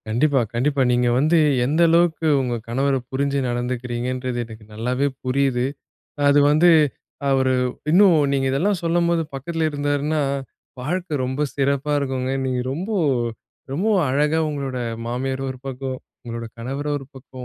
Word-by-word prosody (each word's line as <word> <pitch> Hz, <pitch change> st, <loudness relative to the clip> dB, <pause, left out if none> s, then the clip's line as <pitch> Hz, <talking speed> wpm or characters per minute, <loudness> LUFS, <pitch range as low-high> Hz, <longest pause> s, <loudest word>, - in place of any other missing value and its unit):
கண்டிப்பா, 135 Hz, +5 st, +2 dB
கண்டிப்பா. 135 Hz, +4 st, +1 dB
நீங்க 120 Hz, 0 st, +2 dB
வந்து 155 Hz, +5 st, +3 dB, 0.3 s
எந்த 155 Hz, +6 st, +1 dB
அளவுக்கு 165 Hz, -1 st, +3 dB
உங்க 125 Hz, -2 st, -1 dB
கணவர 135 Hz, +4 st, +1 dB, 0.2 s
புரிஞ்சு 140 Hz, +1 st, 0 dB
நடந்துக்கிறீங்கன்றது 125 Hz, +1 st, -3 dB
எனக்கு 110 Hz, -1 st, -12 dB
நல்லாவே 125 Hz, +5 st, 0 dB, 0.2 s
புரியுது. 130 Hz, -1 st, +1 dB, 0.6 s
அது 145 Hz, 0 st, +5 dB
வந்து, 160 Hz, +4 st, +5 dB, 0.6 s
அவரு 130 Hz, -1 st, +3 dB, 0.4 s
இன்னும் 185 Hz, 0 st, +6 dB, 0.2 s
நீங்க 135 Hz, -1 st, +1 dB
இதெல்லாம் 175 Hz, +8 st, +1 dB
சொல்லும்போது 170 Hz, 0 st, +2 dB
பக்கத்துல 160 Hz, +4 st, -1 dB
இருந்தாருன்னா, 145 Hz, +1 st, 0 dB, 0.6 s
வாழ்க்க 155 Hz, 0 st, -2 dB
ரொம்ப 130 Hz, +3 st, -3 dB, 0.2 s
சிறப்பா 140 Hz, +1 st, +1 dB
இருக்குங்க. 130 Hz, -1 st, -2 dB
நீங்க 125 Hz, -1 st, -1 dB
ரொம்ப 180 Hz, +9 st, -4 dB, 0.8 s
ரொம்பவும் 190 Hz, +4 st, +2 dB
அழகா 150 Hz, +4 st, +2 dB
உங்களோட 140 Hz, -3 st, -3 dB, 0.3 s
மாமியார் 130 Hz, +3 st, -2 dB
ஒரு 130 Hz, -, -7 dB
பக்கம், 130 Hz, 0 st, -4 dB, 0.3 s
உங்களோட 115 Hz, -1 st, -5 dB
கணவர 135 Hz, +5 st, -4 dB
ஒரு 135 Hz, -, -11 dB
பக்கம், 130 Hz, -1 st, -10 dB
135 Hz, 130 wpm, -22 LUFS, 125-150 Hz, 0.8 s, இன்னும்